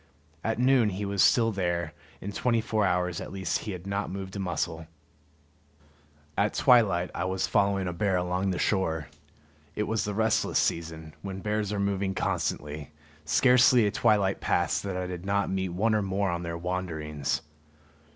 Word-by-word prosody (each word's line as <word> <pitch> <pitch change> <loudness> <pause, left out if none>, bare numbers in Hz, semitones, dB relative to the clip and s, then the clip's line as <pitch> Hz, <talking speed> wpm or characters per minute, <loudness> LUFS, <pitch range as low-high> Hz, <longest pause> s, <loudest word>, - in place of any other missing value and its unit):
At 115 0 -1
noon 125 -2 +4
he 100 +1 -4
was 100 -1 0
still 115 -2 +5
there; 85 -4 -1 0.3
in 100 - -4
twenty 115 +2 +1
four 110 -2 +1
hours 90 -1 0
at - - -7
least 95 0 -1
he 110 - -5
had 90 -1 -7
not 100 +1 -2
moved 95 0 -6
a - - -4
muscle. 80 -3 -3 1.5
At 100 +4 +1
twilight 100 -9 +4
I 85 - -2
was 95 0 0
following 100 -2 +1
a 90 - -2
bear 95 +2 +1
along 90 +2 -1
the 90 - -1
shore. 80 - 0 0.7
It 105 - 0
was 110 0 -1
the 105 -1 -3
restless 110 0 +1
season, 80 -1 -1
when 95 -1 -6
bears 105 0 -1
are 105 - -2
moving 100 -1 -1
constantly; 75 0 -2 0.4
scarcely 125 - +5
a 105 - +1
twilight 105 -4 +2
passed - - +1
that 95 -2 -4
I 90 - -2
did 90 -1 -6
not 100 +1 0
meet 95 -1 -1
one 105 +6 +1
or 105 - +2
more 95 -1 0
on 85 0 -2
their 85 -1 -4
wanderings. 80 -5 -3
95 Hz, 175 wpm, -28 LUFS, 90-105 Hz, 1.5 s, still